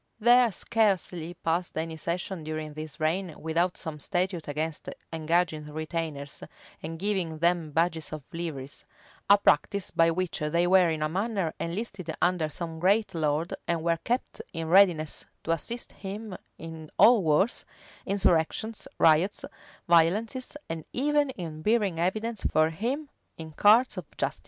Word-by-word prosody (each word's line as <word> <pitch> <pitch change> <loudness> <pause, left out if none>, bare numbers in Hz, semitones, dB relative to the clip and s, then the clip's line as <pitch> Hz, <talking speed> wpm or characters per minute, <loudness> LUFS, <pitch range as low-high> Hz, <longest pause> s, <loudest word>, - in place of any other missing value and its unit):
There 240 +1 +5
scarcely 185 -6 0
passed 170 +1 -2
any 160 0 -2
session 170 +2 -4
during 155 -1 -5
this 155 0 -7
reign 165 +2 -1
without 170 +3 0
some 160 -3 -6
statute 180 0 -2
against 155 +2 -3 0.2
engaging 160 -1 0
retainers, 155 -2 -4 0.4
and 165 +1 -6
giving 185 -4 -1
them 170 -1 +1
badges 165 0 0
or 155 -2 -6
liveries; 150 -5 -5
[v] - - -34 0.3
a 200 - +9
practice 200 +1 +2
by 165 0 +4
which 180 +1 -2
they 170 +3 +1
were 180 -1 +5
in 155 -1 -1
a - - +2
manner 195 0 -1
enlisted 185 0 -4
under 175 -3 +1
some 165 +1 -6
great 200 +4 +2
lord 155 0 0
and 170 -2 0
were 165 -1 +1
kept 245 +2 -2
in 165 -1 -4
readiness 170 -5 +4 0.2
to 165 - -1
assist 230 +9 -3
him 200 +1 -7 0.2
in 160 -1 -9
all 235 -2 +7
wars, 165 +7 +2 0.4
insurrections, 200 - 0
riots, 165 +6 +3 0.4
violences, 210 - +2
and 165 -1 -5
even 290 +2 +2
in 165 -10 -6
bearing 210 -4 +1
evidence 215 +5 -1
for 155 +1 +3
him 250 - -3 0.3
in 160 -1 -8
courts 215 +10 +4
of - - -9
justice. - - -1
170 Hz, 145 wpm, -28 LUFS, 160-200 Hz, 0.4 s, a